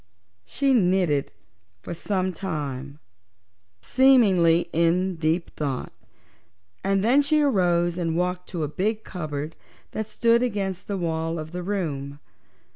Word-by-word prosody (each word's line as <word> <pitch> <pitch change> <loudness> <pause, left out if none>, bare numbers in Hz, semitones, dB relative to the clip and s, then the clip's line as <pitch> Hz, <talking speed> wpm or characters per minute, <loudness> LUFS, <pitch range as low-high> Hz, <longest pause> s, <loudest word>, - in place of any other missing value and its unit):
She 275 -1 +1
knitted 180 - +2 0.5
for - - -5
some 185 +1 -2
time, 145 -6 -5 0.9
seemingly 195 -11 +4
in 175 +3 +2
deep 160 +2 0
thought, 140 -4 -3 0.9
and 195 0 +1
then 255 +6 +5
she 300 +2 +2
arose 175 -8 +2
and 165 -1 -1
walked 180 0 -2
to 170 -4 -3
a - - 0
big 210 +8 -2
cupboard 155 -3 -5 0.4
that 220 -1 -4
stood 235 +1 +2
against 200 -6 -2
the 200 - -2
wall 165 -1 -2
of 155 0 -6
the 180 +1 -4
room. 150 -8 -3
180 Hz, 125 wpm, -25 LUFS, 160-200 Hz, 0.9 s, then